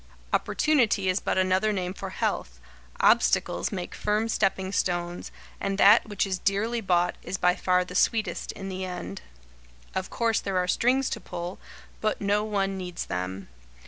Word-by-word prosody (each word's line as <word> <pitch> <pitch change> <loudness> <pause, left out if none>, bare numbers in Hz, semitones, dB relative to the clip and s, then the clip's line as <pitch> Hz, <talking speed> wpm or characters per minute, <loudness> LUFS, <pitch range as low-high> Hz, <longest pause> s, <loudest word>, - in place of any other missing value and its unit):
Opportunity 235 -11 +2
is 185 +2 +2
but - - -1
another 185 +3 +2
name 185 -3 -2
for 195 0 -6
health, - - -2 0.4
obstacles - - +3
make 180 -3 -5
firm 210 +2 0
stepping 190 -3 0
stones, 175 -2 -2 0.3
and 195 0 -2
that 210 +2 +6
which 205 - 0
is 190 -2 -2
dearly 220 +5 0
bought 180 -3 +2
is 190 - -4
by 180 0 +3
far 180 -1 +2
the 180 - -9
sweetest 220 +4 +1
in 195 - -7
the 190 0 -4
end. 100 - -5 0.7
Of 190 0 -3
course 230 -2 +1
there 195 -2 -2
are 180 0 +1
"strings 255 +7 +2
to - - -2
pull," 175 +2 -6 0.4
but 215 0 0
no 205 +1 +1
one 195 -2 -1
needs 180 -1 -5
them. 90 +2 -4
190 Hz, 165 wpm, -27 LUFS, 180-210 Hz, 0.7 s, that